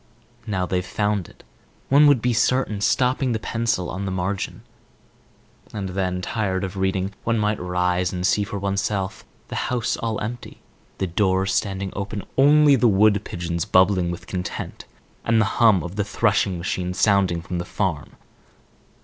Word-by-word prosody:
"Now 95 Hz, -3 st, -1 dB
they've 90 Hz, 0 st, -1 dB
found 105 Hz, -1 st, -1 dB
it," -, -, -19 dB, 0.5 s
one 145 Hz, +2 st, +6 dB
would 140 Hz, -6 st, +4 dB
be 125 Hz, 0 st, +2 dB
certain, 120 Hz, -3 st, +1 dB
stopping 125 Hz, +3 st, +1 dB
the 110 Hz, -, -1 dB
pencil 115 Hz, -5 st, -1 dB
on 95 Hz, +2 st, -4 dB
the 95 Hz, -, -3 dB
margin. 95 Hz, +1 st, -3 dB, 1.1 s
And 100 Hz, -2 st, -3 dB
then, 90 Hz, -1 st, -2 dB
tired 95 Hz, -3 st, -1 dB
of 95 Hz, 0 st, -4 dB
reading, 95 Hz, 0 st, -1 dB
one 115 Hz, 0 st, +1 dB
might 105 Hz, 0 st, 0 dB
rise 90 Hz, 0 st, 0 dB
and 90 Hz, -1 st, -3 dB
see 105 Hz, -, +2 dB
for 100 Hz, 0 st, -5 dB
oneself, 100 Hz, 0 st, -2 dB, 0.3 s
the -, -, -5 dB
house 120 Hz, -2 st, -1 dB
all 115 Hz, -2 st, -2 dB
empty, 120 Hz, +3 st, -6 dB, 0.4 s
the 95 Hz, -, -1 dB
doors 95 Hz, +1 st, +1 dB
standing 95 Hz, -1 st, -2 dB
open, 100 Hz, +1 st, -4 dB
only 145 Hz, +1 st, +6 dB
the 125 Hz, -1 st, +3 dB
wood 105 Hz, 0 st, +4 dB
pigeons 85 Hz, -3 st, -3 dB
bubbling 95 Hz, -1 st, +3 dB
with 85 Hz, -, -6 dB
content 90 Hz, -1 st, -5 dB, 0.4 s
and 115 Hz, -1 st, +2 dB
the 110 Hz, -, +3 dB, 0.2 s
hum 110 Hz, -6 st, +5 dB
of 90 Hz, +3 st, -7 dB
the 105 Hz, -, +1 dB
threshing 100 Hz, -3 st, +1 dB
machine 90 Hz, +1 st, -3 dB
sounding 95 Hz, -5 st, +2 dB
from 90 Hz, 0 st, -4 dB
the -, -, -2 dB
farm. 85 Hz, -6 st, -3 dB
100 Hz, 165 wpm, -23 LUFS, 90-110 Hz, 1.1 s, one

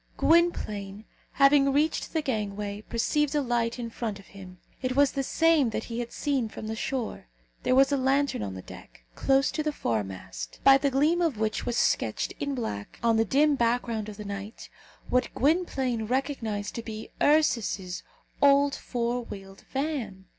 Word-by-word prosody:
Gwynplaine, 215 Hz, -, +1 dB, 0.3 s
having 275 Hz, 0 st, +5 dB
reached 300 Hz, +3 st, 0 dB
the 320 Hz, -2 st, -1 dB
gangway, 205 Hz, -4 st, -3 dB
perceived 290 Hz, +7 st, 0 dB
a 295 Hz, -, +3 dB
light 235 Hz, -1 st, 0 dB
in 235 Hz, -2 st, -5 dB
front 225 Hz, -3 st, -4 dB
of 195 Hz, -, -15 dB
him. 185 Hz, -2 st, -11 dB, 0.2 s
It 255 Hz, -1 st, -1 dB
was 285 Hz, -1 st, +4 dB
the 275 Hz, -, -1 dB
same 320 Hz, -1 st, +3 dB
that 220 Hz, -, -3 dB
he 235 Hz, 0 st, -5 dB
had 235 Hz, -1 st, -4 dB
seen 270 Hz, -6 st, -1 dB
from 215 Hz, -, -8 dB
the 220 Hz, +1 st, -3 dB
shore. 245 Hz, -, -4 dB, 0.3 s
There 255 Hz, -, +2 dB
was 270 Hz, +1 st, +5 dB
a 280 Hz, -, +2 dB
lantern 275 Hz, -, +1 dB
on 100 Hz, -2 st, -4 dB
the 95 Hz, -, -8 dB
deck, -, -, -13 dB
close 270 Hz, +1 st, +2 dB
to 310 Hz, -, -2 dB
the 305 Hz, 0 st, 0 dB
foremast, 95 Hz, -, -4 dB
by 275 Hz, 0 st, +7 dB
the 280 Hz, -, +2 dB
gleam 300 Hz, +6 st, +2 dB
of 320 Hz, -9 st, +1 dB
which 220 Hz, 0 st, -1 dB
was 240 Hz, -1 st, -1 dB
sketched -, -, +1 dB
in 285 Hz, -1 st, -2 dB
black, 105 Hz, -, -5 dB
on 230 Hz, -1 st, +3 dB
the 225 Hz, -, +3 dB
dim 290 Hz, +7 st, +3 dB
background 235 Hz, -3 st, 0 dB
of 205 Hz, -, -9 dB
the 210 Hz, -, -7 dB
night, 200 Hz, +2 st, -7 dB, 0.4 s
what 250 Hz, 0 st, +2 dB
Gwynplaine 265 Hz, -7 st, +1 dB
recognized 230 Hz, -5 st, -2 dB
to 230 Hz, -, -4 dB
be 220 Hz, -1 st, -8 dB
Ursus's 230 Hz, -, +2 dB, 0.4 s
old 280 Hz, 0 st, +5 dB
four 240 Hz, 0 st, -2 dB
wheeled 195 Hz, -3 st, -10 dB
van. 265 Hz, -10 st, -3 dB
240 Hz, 175 wpm, -27 LUFS, 210-280 Hz, 0.4 s, by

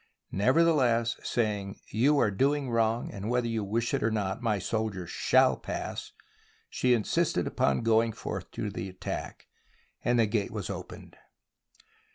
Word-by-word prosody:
Neverthe 160 Hz, -, +4 dB
less, 120 Hz, -4 st, +2 dB
saying, 105 Hz, -3 st, -2 dB
" -, -, -21 dB
You 145 Hz, +3 st, +5 dB
are 105 Hz, -, +3 dB
doing 135 Hz, +4 st, +1 dB
wrong, 115 Hz, 0 st, +1 dB
and 100 Hz, +2 st, -5 dB
whether 125 Hz, 0 st, +1 dB
you 115 Hz, -2 st, -1 dB
wish 115 Hz, +5 st, -1 dB
it 140 Hz, -, +1 dB
or 115 Hz, -, +2 dB
not, 105 Hz, 0 st, -2 dB
my 110 Hz, -3 st, +1 dB
soldiers 100 Hz, -3 st, -3 dB
shall -, -, +3 dB
pass," -, -, -5 dB, 0.6 s
she 125 Hz, -1 st, +3 dB
in 110 Hz, -, -1 dB
sisted -, -, +1 dB
upon 70 Hz, +6 st, +1 dB
going 115 Hz, 0 st, +3 dB
forth -, -, -6 dB
to -, -, -3 dB
the 95 Hz, -, -5 dB
attack, 95 Hz, -, -6 dB, 0.6 s
and 120 Hz, 0 st, +2 dB
the 115 Hz, -, +5 dB
gate 105 Hz, -1 st, -1 dB
was -, -, -4 dB
opened. -, -, -9 dB
115 Hz, 165 wpm, -29 LUFS, 105-120 Hz, 0.6 s, You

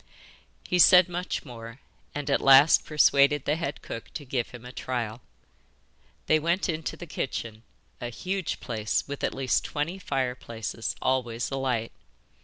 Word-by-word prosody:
He 180 Hz, -, +1 dB
said 180 Hz, +1 st, +8 dB
much 180 Hz, -1 st, -4 dB
more, 115 Hz, -1 st, -10 dB, 0.4 s
and 145 Hz, -2 st, -4 dB
at -, -, +2 dB
last 135 Hz, +3 st, +7 dB
persuaded 145 Hz, -1 st, +4 dB
the 150 Hz, -, +1 dB
head 150 Hz, -3 st, -4 dB
cook 115 Hz, -, -7 dB
to 145 Hz, -, -6 dB
give 125 Hz, -2 st, -2 dB
him 120 Hz, -1 st, -11 dB
a 125 Hz, -, -8 dB
trial. 120 Hz, -3 st, -4 dB, 1.0 s
They 155 Hz, -, +3 dB
went 170 Hz, +4 st, 0 dB
into 160 Hz, -3 st, -3 dB
the 175 Hz, -, -8 dB
kitchen 115 Hz, -8 st, -4 dB, 0.4 s
a 120 Hz, -, -3 dB
huge 185 Hz, +8 st, -3 dB
place 110 Hz, -3 st, -1 dB
with 140 Hz, 0 st, -6 dB
at -, -, -1 dB
least 130 Hz, -2 st, +1 dB
twenty 160 Hz, +6 st, -3 dB
fireplaces, 125 Hz, -, -3 dB
always 125 Hz, -2 st, 0 dB
alight. 130 Hz, -4 st, -1 dB
135 Hz, 150 wpm, -27 LUFS, 120-155 Hz, 1.0 s, said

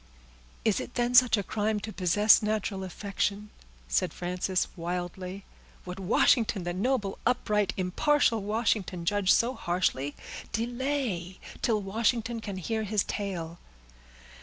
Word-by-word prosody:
"Is 220 Hz, -3 st, +3 dB
it -, -, -7 dB
then 240 Hz, 0 st, 0 dB
such 245 Hz, -2 st, +6 dB
a 205 Hz, -, -1 dB
crime 215 Hz, +1 st, -1 dB
to 215 Hz, +1 st, -6 dB
possess 205 Hz, +5 st, +5 dB
natural 210 Hz, -2 st, -1 dB
affection?" 200 Hz, +2 st, -3 dB, 0.4 s
said -, -, 0 dB
Frances 180 Hz, +1 st, -1 dB
wildly. 180 Hz, +2 st, -5 dB, 0.4 s
"Would 180 Hz, +1 st, -6 dB
Washington—the 195 Hz, -2 st, +2 dB
noble, 205 Hz, 0 st, -1 dB
upright, 210 Hz, -5 st, +1 dB
impartial 225 Hz, -, +2 dB
Washington, 205 Hz, -4 st, -1 dB
judge 205 Hz, +1 st, +2 dB
so 240 Hz, +2 st, +3 dB
harshly? 170 Hz, -, -1 dB, 0.4 s
Delay, 240 Hz, -6 st, -2 dB, 0.2 s
till 220 Hz, -3 st, +1 dB
Washington 230 Hz, +3 st, 0 dB
can 200 Hz, -3 st, -5 dB
hear 220 Hz, +5 st, -2 dB
his 210 Hz, -1 st, 0 dB
tale." 175 Hz, -5 st, -4 dB
205 Hz, 120 wpm, -28 LUFS, 180-225 Hz, 0.4 s, such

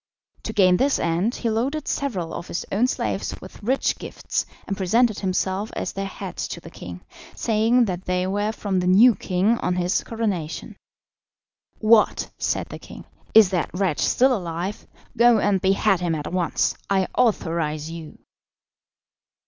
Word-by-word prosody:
To -, -, -4 dB
gain 185 Hz, -3 st, +5 dB
this 275 Hz, +5 st, +2 dB
end, 175 Hz, +8 st, 0 dB
he 235 Hz, -, -2 dB
loaded 270 Hz, +7 st, -1 dB
several 190 Hz, -13 st, -2 dB
of 170 Hz, -, -6 dB
his -, -, -4 dB
own 225 Hz, +6 st, +2 dB
slaves -, -, -3 dB
with -, -, -12 dB
rich 255 Hz, +6 st, 0 dB
gifts, -, -, -3 dB, 0.2 s
and 195 Hz, -, -2 dB
presented 215 Hz, +4 st, +2 dB
himself 190 Hz, +2 st, -1 dB
at -, -, -2 dB
their 195 Hz, 0 st, -4 dB
head 195 Hz, -, -8 dB
to -, -, -4 dB
the -, -, -12 dB
king, 90 Hz, 0 st, -9 dB, 0.3 s
saying 230 Hz, +2 st, +2 dB
that 185 Hz, -2 st, -4 dB
they 180 Hz, 0 st, 0 dB
were 205 Hz, +3 st, 0 dB
from 200 Hz, -3 st, -2 dB
the 180 Hz, -, -1 dB
new 220 Hz, +7 st, +7 dB
king 200 Hz, +4 st, 0 dB
on 180 Hz, -, -1 dB
his 180 Hz, +1 st, 0 dB
coronation. 200 Hz, -9 st, -3 dB, 1.0 s
"What!" 215 Hz, 0 st, +3 dB
said -, -, -1 dB
the -, -, -8 dB
king; -, -, -12 dB, 0.3 s
"is 215 Hz, -4 st, +8 dB
that 175 Hz, -3 st, 0 dB
wretch 185 Hz, -5 st, 0 dB
still 260 Hz, 0 st, +3 dB
alive? 180 Hz, +2 st, -5 dB, 0.3 s
Go 235 Hz, -1 st, +5 dB
and 200 Hz, -2 st, +1 dB
behead 195 Hz, 0 st, +2 dB
him 175 Hz, -2 st, -1 dB
at 150 Hz, +2 st, -5 dB
once. 180 Hz, -2 st, 0 dB
I 190 Hz, -1 st, +2 dB
authorise 165 Hz, -8 st, 0 dB
you." 165 Hz, -2 st, -9 dB
195 Hz, 160 wpm, -23 LUFS, 180-225 Hz, 1.0 s, is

